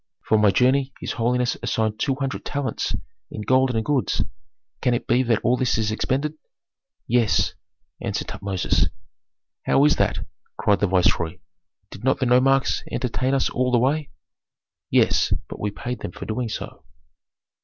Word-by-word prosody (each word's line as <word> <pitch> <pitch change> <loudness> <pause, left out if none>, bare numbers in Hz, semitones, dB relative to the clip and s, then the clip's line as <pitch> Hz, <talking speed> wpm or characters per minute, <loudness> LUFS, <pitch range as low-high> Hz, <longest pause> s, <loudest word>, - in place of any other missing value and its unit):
"For 110 - +3
my 105 -1 +5
journey 130 +6 +2
his - - -4
holiness 125 +1 0
assigned 110 -1 -1
two 135 -2 +1
hundred 135 -1 -3
talents 140 -2 -2 0.3
in - - -6
gold 130 +1 +3
and 110 - 0
goods. 145 -4 +1 0.6
Can 125 - +2
it - - -3
be 120 +2 +3
that 120 -3 +2
all 125 - +3
this 125 -3 +1
is 110 -1 0
expended?" 135 +7 -1 0.7
"Yes," 115 -8 +2 0.5
answered - - -3
Tutmosis. 95 -2 0 0.8
"How 140 - +5
is 150 - +4
that?" - - 0 0.3
cried 100 -1 +2
the 100 - +2
viceroy. 90 -3 +2 0.5
"Did - - -10
not 130 - +3
the 130 - 0
nomarchs 130 +2 +3
entertain 130 +2 0
us 135 - +1
all 125 +1 +1
the 120 - +4
way?" 140 +5 +1 0.8
"Yes, - - +3
but - - -8
we 105 - -1
paid 120 +4 -5
them 85 - -6
for - - -8
doing 115 +2 -2
so." - - -6
125 Hz, 160 wpm, -23 LUFS, 110-130 Hz, 0.8 s, my